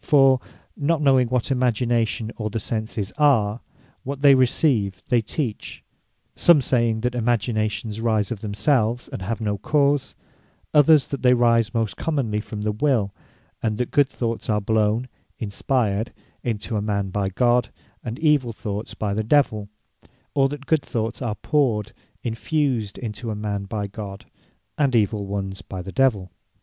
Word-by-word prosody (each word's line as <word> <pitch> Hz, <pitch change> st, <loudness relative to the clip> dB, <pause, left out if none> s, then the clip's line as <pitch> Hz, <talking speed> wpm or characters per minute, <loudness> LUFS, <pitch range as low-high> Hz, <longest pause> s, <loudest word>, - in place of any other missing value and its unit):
For 135 Hz, -4 st, +5 dB, 0.4 s
(not 155 Hz, +2 st, +1 dB
knowing 135 Hz, -4 st, +4 dB
what 125 Hz, +2 st, -1 dB
Imagination, 120 Hz, -2 st, 0 dB
or 110 Hz, -1 st, -3 dB
the 115 Hz, +2 st, -3 dB
Senses 110 Hz, -1 st, -3 dB
are), 120 Hz, -7 st, +3 dB, 0.4 s
what 140 Hz, +1 st, -5 dB
they 140 Hz, -1 st, +8 dB
receive, 120 Hz, -, +2 dB
they 120 Hz, -3 st, +3 dB
teach: 115 Hz, 0 st, -4 dB, 0.5 s
some 170 Hz, -3 st, +6 dB
saying, 115 Hz, -4 st, +1 dB
that 125 Hz, +1 st, 0 dB
Imaginations 110 Hz, -2 st, -1 dB
rise 110 Hz, -2 st, +1 dB
of 115 Hz, -, -3 dB
themselves, 115 Hz, +3 st, 0 dB
and -, -, -6 dB
have 110 Hz, +4 st, -3 dB
no 105 Hz, -2 st, -2 dB
cause: 140 Hz, +2 st, +1 dB, 0.6 s
Others 150 Hz, -1 st, +5 dB
that 140 Hz, -, -4 dB
they 125 Hz, -1 st, +5 dB
rise 115 Hz, -1 st, +2 dB
most 110 Hz, -4 st, -1 dB
commonly 130 Hz, -10 st, -1 dB
from 105 Hz, -1 st, -6 dB
the 105 Hz, -, +1 dB
Will; 110 Hz, -4 st, +1 dB, 0.5 s
and 110 Hz, -2 st, -1 dB
that 125 Hz, -, -2 dB
Good 145 Hz, -2 st, +3 dB
thoughts 115 Hz, -3 st, -3 dB
are 105 Hz, -1 st, +2 dB
blown 110 Hz, +3 st, +1 dB, 0.3 s
(inspired) 110 Hz, 0 st, -1 dB, 0.3 s
into 110 Hz, -1 st, -3 dB
a 105 Hz, -, 0 dB
man, 100 Hz, -2 st, -1 dB
by 100 Hz, 0 st, -1 dB
God; 120 Hz, +3 st, +2 dB, 0.3 s
and 115 Hz, 0 st, -5 dB
evill 145 Hz, -7 st, +3 dB
thoughts 105 Hz, 0 st, -5 dB
by 105 Hz, -2 st, -2 dB
the 110 Hz, +2 st, -1 dB
Divell: 110 Hz, -5 st, +2 dB, 0.6 s
or 135 Hz, -1 st, +3 dB
that 145 Hz, 0 st, -7 dB
Good 160 Hz, -1 st, +2 dB
thoughts 115 Hz, -1 st, -3 dB
are 115 Hz, -4 st, -2 dB
powred 125 Hz, -9 st, 0 dB, 0.3 s
(infused) 120 Hz, -2 st, -1 dB
into 115 Hz, 0 st, -5 dB
a 110 Hz, -, -2 dB
man, 105 Hz, -1 st, -3 dB
by 105 Hz, +1 st, -3 dB
God; 100 Hz, -1 st, -8 dB, 0.5 s
and 140 Hz, -4 st, +2 dB
evill 105 Hz, -2 st, +1 dB
ones 95 Hz, -1 st, -4 dB
by 95 Hz, 0 st, -7 dB
the 95 Hz, -, -7 dB
Divell. 110 Hz, -9 st, +1 dB
115 Hz, 160 wpm, -23 LUFS, 105-130 Hz, 0.6 s, they